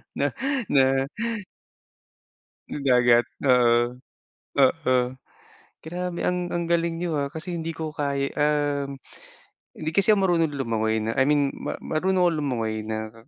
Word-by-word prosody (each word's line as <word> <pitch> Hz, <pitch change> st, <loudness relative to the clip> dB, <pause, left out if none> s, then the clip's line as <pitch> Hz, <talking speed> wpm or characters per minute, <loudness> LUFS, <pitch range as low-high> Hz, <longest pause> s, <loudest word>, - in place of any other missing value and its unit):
na -, -, 0 dB, 0.4 s
na 135 Hz, -1 st, +4 dB, 1.7 s
na -, -, -4 dB
dagat, 120 Hz, -2 st, +5 dB, 0.2 s
oo. 120 Hz, -2 st, +3 dB, 0.6 s
Oo. 135 Hz, 0 st, +3 dB, 0.9 s
Grabe 175 Hz, +2 st, -4 dB
ang 180 Hz, -1 st, -2 dB
ang 170 Hz, 0 st, -1 dB
galing 170 Hz, -1 st, 0 dB
niyo, 170 Hz, -3 st, -1 dB
ah, 140 Hz, -1 st, -1 dB
kasi 170 Hz, +2 st, -4 dB
hindi 165 Hz, 0 st, -3 dB
ko 160 Hz, -1 st, -5 dB
kaya, 140 Hz, -2 st, -1 dB
um, 145 Hz, -2 st, 0 dB, 0.8 s
hindi 160 Hz, 0 st, -2 dB
kasi 200 Hz, +2 st, +4 dB
ako 210 Hz, -, +5 dB
marunong 165 Hz, -3 st, +2 dB
lumangoy 115 Hz, -5 st, -1 dB
na 110 Hz, +1 st, -2 dB
I -, -, +3 dB
mean, 145 Hz, 0 st, +2 dB
ma -, -, -5 dB
marunong 185 Hz, +4 st, 0 dB
akong 165 Hz, -3 st, +1 dB
lumangoy 110 Hz, -5 st, -2 dB
na 110 Hz, 0 st, -5 dB
140 Hz, 135 wpm, -25 LUFS, 125-165 Hz, 1.7 s, dagat